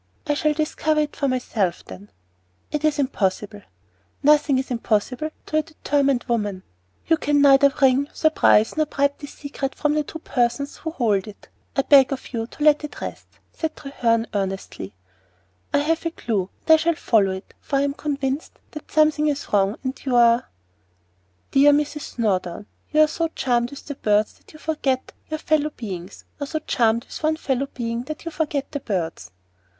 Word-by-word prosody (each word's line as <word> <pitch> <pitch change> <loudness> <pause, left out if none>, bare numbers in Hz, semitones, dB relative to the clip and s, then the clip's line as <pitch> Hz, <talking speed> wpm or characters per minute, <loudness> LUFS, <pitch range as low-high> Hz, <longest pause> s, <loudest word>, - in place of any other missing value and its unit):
"I 295 - +1
shall 305 +1 +1
discover 310 0 +1
it 300 - -3
for 280 - 0
myself, 230 -8 -1
then." 95 +2 -11 0.6
"It 300 0 -2
is 310 -1 +2
impossible." 210 -6 -1 0.6
"Nothing 295 -1 +4
is 260 0 -3
impossible 245 +5 0 0.2
to 310 - -1
a - - +4
determined 285 -4 0
woman." 205 -6 -1 0.4
"You 325 - +3
can 290 -1 +1
neither 280 0 +6
wring, 270 +1 +4
surprise, 310 -8 +3
nor 310 -1 +1
bribe 280 -1 +1
this 290 - -9
secret 280 -2 -5
from 295 0 +1
the 305 0 +1
two 320 - -8
persons 250 -1 -1
who 320 - -5
hold 220 - 0
it. 210 - -13 0.3
I 275 - +2
beg 275 -2 +6
of 265 -1 -5
you 225 -1 -2
to 295 - -7
let 300 0 +5
it 300 - -7
rest," - - -7 0.3
said 320 -1 -3
Treherne 230 -5 0
earnestly. 190 - -4 0.8
"I - - +3
have 315 +3 +1
a 335 - 0
clue, 210 - -2 0.2
and 320 - +7
I - - +8
shall 330 +1 +1
follow 215 -9 +2
it; 190 +1 -9
for 280 - -4
I 275 - +3
am 280 0 0
convinced 280 -1 -3 0.2
that 305 - -9
something 305 0 +3
is 285 -5 -3
wrong, 200 +2 +2
and 260 0 -4
you 260 -3 0
are 235 0 +4 0.5
" 90 +1 -42
"Dear 285 +1 +6
Mrs. 295 0 -2
Snowdon, 190 -5 -1 0.3
are - - +5
you - - +8
so 330 +2 -1
charmed 240 -2 +1
with 280 - -11
the 290 - -5
birds 210 -4 +1
that - - -20
you 310 - -13
forget 290 -5 -1 0.2
your 310 - -2
fellow 305 -1 +1
beings, 195 - -8
or 285 - -3
so 315 - -2
charmed 235 -6 +1
with - - -9
one 315 0 +1
fellow 275 -3 -1
being 230 -1 -2
that 310 +3 -7
you 330 - -4
forget 295 -3 -2
the 285 - -3
birds?" 170 - -3
275 Hz, 185 wpm, -23 LUFS, 225-300 Hz, 0.8 s, I